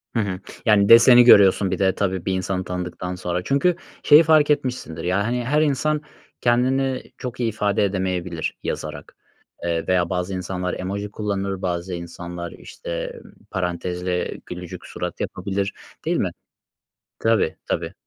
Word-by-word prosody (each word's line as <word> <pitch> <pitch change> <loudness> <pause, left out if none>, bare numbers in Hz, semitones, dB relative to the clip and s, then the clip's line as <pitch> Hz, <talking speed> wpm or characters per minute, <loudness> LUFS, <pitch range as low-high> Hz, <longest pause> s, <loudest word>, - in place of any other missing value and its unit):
Hı - - +2
hı. 100 -4 -2 0.3
Yani 100 -3 +4
deseni 120 +2 +9
görüyorsun 100 -4 +6
bir 95 - -2
de 95 -1 +2
tabii 95 -3 -1
bir 95 - 0
insanı 95 0 -1
tanıdıktan 90 0 -4
sonra. 90 -1 -3
Çünkü 140 - +2 0.3
şeyi 150 +3 +8
fark 155 -2 +4
etmişsindir, 125 - -1
ya, 90 +3 +1
hani, 120 +3 -1
her 150 +5 +2
insan 150 +1 +1 0.4
kendini 130 +2 +1
çok 125 0 -6
iyi 120 -2 +1
ifade 105 -1 0
edemeyebilir 95 -4 -2
yazarak. - - -5 0.5
Eee, 85 -1 -1
veya 90 -1 +2
bazı 90 0 -2
insanlar 90 0 -3
emoji 100 +2 -4
kullanır, 100 -2 -3
bazı 90 0 -2
insanlar, 85 0 -6
işte, - - -6 0.3
parantezle 90 -1 -2
gülücük 90 -1 -8
surat - - -5
yapabilir, 100 0 -2 0.3
değil - - +1
mi? - - 0 0.9
Tabii, 115 -8 +2
tabii. - - -2
95 Hz, 145 wpm, -22 LUFS, 90-120 Hz, 0.9 s, deseni